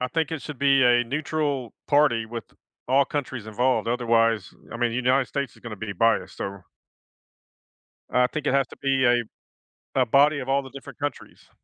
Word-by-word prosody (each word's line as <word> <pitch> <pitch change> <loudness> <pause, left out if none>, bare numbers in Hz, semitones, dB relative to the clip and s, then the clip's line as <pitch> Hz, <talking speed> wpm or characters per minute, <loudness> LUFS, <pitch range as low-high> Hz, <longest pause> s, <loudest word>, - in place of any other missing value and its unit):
I 125 - -1
think 160 +5 -1
it 160 -3 -4
should 150 -4 -8
be 135 -1 +4
a 120 -1 +4
neutral 140 -1 -2
party, 145 -6 +3
with 115 -1 -8 0.4
all 135 +2 +4
countries 130 -6 -4
involved, 115 +1 0
otherwise 115 -2 +1 0.2
I - - -6
mean, 120 0 +1
the 115 - -3
United 130 +1 +2
States 140 0 -4
is - - -19
gonna 115 -3 -7
be 105 +1 -5
biased, 100 -1 +1
so 100 -2 -6 1.5
I 125 0 +3
think 150 0 -5
it 135 - +2
has 135 -1 +3
to - - -13
be 135 -1 +1
a 120 -1 +4 0.7
a - - +3
body 145 +5 +4
of 130 - -6
all 135 +1 +2
the 135 - -11
different 135 0 -11
countries. 145 -2 -6
125 Hz, 190 wpm, -25 LUFS, 115-140 Hz, 1.5 s, be